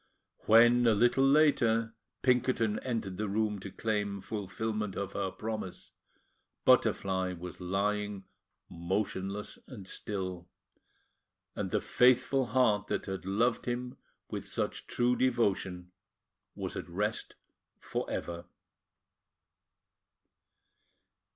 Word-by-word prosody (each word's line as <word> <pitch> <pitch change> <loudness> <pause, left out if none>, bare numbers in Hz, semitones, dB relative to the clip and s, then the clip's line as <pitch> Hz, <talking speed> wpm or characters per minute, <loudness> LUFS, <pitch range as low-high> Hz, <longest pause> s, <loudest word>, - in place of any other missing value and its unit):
When, 120 +2 +6
a 110 - +5
little 120 +5 +4
later, 120 -6 +4 0.3
Pinkerton 125 -4 +2
entered 110 -7 -3
the 105 -1 -2
room 105 0 0
to 100 - -7
claim 105 -1 -2
fulfilment 105 +1 -3
of 100 -1 -4
her 100 -1 -1
promise, 110 -2 -6 0.7
Butterfly 95 -1 +3
was 90 +1 -8
lying 100 +2 -1 0.4
motionless 95 +3 -3
and 105 -8 -10
still; 95 -4 -4 1.1
and 100 -2 -2
the 105 +1 0
faithful 125 +1 +3
heart 110 -4 +2
that - - -2
had 95 -1 -5
loved 115 +6 +1
him 125 +1 -3 0.3
with - - -5
such - - -3
true 120 +1 +2
devotion 95 -8 0 0.6
was - - -5
at - - -6
rest 105 +5 -2 0.4
for - - -4
ever! 85 0 -4
105 Hz, 105 wpm, -31 LUFS, 95-120 Hz, 1.1 s, When